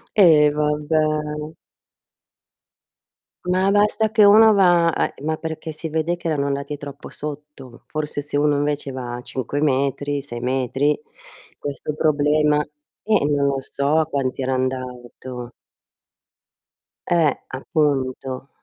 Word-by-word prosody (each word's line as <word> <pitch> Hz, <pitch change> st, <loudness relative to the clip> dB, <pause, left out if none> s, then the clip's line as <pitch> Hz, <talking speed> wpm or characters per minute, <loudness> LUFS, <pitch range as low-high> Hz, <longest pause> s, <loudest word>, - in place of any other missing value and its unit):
Eh 155 Hz, -7 st, +6 dB
vabbè. 150 Hz, +1 st, 0 dB, 2.5 s
Ma 185 Hz, +2 st, +2 dB
basta 210 Hz, +1 st, +3 dB
che 215 Hz, -1 st, +4 dB
uno 215 Hz, +2 st, +7 dB
va 175 Hz, -4 st, +4 dB
ehm, 140 Hz, -, -2 dB
ma 155 Hz, 0 st, 0 dB
perché 160 Hz, 0 st, -6 dB
si 155 Hz, +1 st, -5 dB
vede 160 Hz, +2 st, 0 dB
che 175 Hz, -1 st, -6 dB
erano 145 Hz, -3 st, 0 dB
andati 140 Hz, +1 st, -3 dB
troppo 145 Hz, -1 st, -9 dB
sotto. 150 Hz, -4 st, -9 dB
Forse 150 Hz, -1 st, -3 dB
se 145 Hz, 0 st, -3 dB
uno 145 Hz, 0 st, +3 dB
invece 145 Hz, -1 st, -1 dB
va 125 Hz, -2 st, -5 dB
a 120 Hz, -, -7 dB
5 135 Hz, +3 st, -4 dB
metri, 140 Hz, +1 st, 0 dB
6 120 Hz, -4 st, -7 dB
metri 130 Hz, +3 st, 0 dB, 0.6 s
questo 145 Hz, +1 st, -5 dB
problema 150 Hz, 0 st, +2 dB, 0.4 s
Eh, 220 Hz, 0 st, +2 dB
e 145 Hz, -, +2 dB
non 140 Hz, 0 st, +2 dB
lo 140 Hz, -1 st, 0 dB
so 145 Hz, +4 st, 0 dB
quanti 130 Hz, -1 st, -1 dB
era 130 Hz, -, 0 dB
andato. 125 Hz, -1 st, -5 dB, 1.6 s
Eh, 165 Hz, -5 st, +2 dB
appunto. 135 Hz, -2 st, -2 dB
145 Hz, 125 wpm, -21 LUFS, 135-160 Hz, 2.5 s, uno